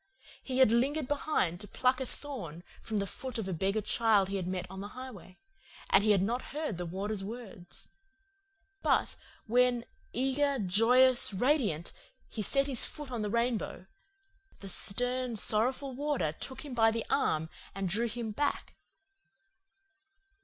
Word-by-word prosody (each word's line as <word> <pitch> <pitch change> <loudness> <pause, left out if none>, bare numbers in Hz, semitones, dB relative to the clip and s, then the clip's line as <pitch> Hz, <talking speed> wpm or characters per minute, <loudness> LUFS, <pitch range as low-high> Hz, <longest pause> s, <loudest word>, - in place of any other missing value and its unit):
He 260 -1 -3
had 260 -4 +6
lingered 270 +5 +1
behind 280 - 0
to 205 - -6
pluck 255 +5 +1
a 260 - -3
thorn 180 - -6 0.2
from 220 - -3
the 200 - 0
foot 250 +5 -6
of 220 -4 -3
a 190 - -2
beggar 195 +5 0
child 210 -3 +2
he 200 - -1
had 180 -2 -3
met 185 -1 -2
on 190 +1 -8
the 200 - -5
highway, 220 -8 -9 0.5
and 195 - +6
he 215 - +2
had 195 -3 +4
not 240 +5 -1 0.2
heard 300 - -3
the 175 - -3
Warder's 195 +3 -3
words. 200 -5 -6 0.9
But - - +2 0.3
when, 245 +1 +2 0.3
eager, 270 +3 +1
joyous, 235 +3 +5
radiant, 210 - +1 0.4
he 220 - -3
set 275 +6 +3
his 265 -4 +2
foot 295 -3 -5
on 240 -3 -3
the 210 - -2
rainbow, 235 -4 -1 0.7
the 195 - -7
stern, 245 +5 +2
sorrowful 255 +6 +1
Warder 275 - -1
took 260 - -6
him 280 - -7
by 225 -2 +5
the 225 0 -2
arm 160 +1 +1 0.3
and 195 -1 -2
drew 220 +6 0
him 230 -1 -4
back. 290 +7 -2
230 Hz, 160 wpm, -31 LUFS, 195-255 Hz, 0.9 s, had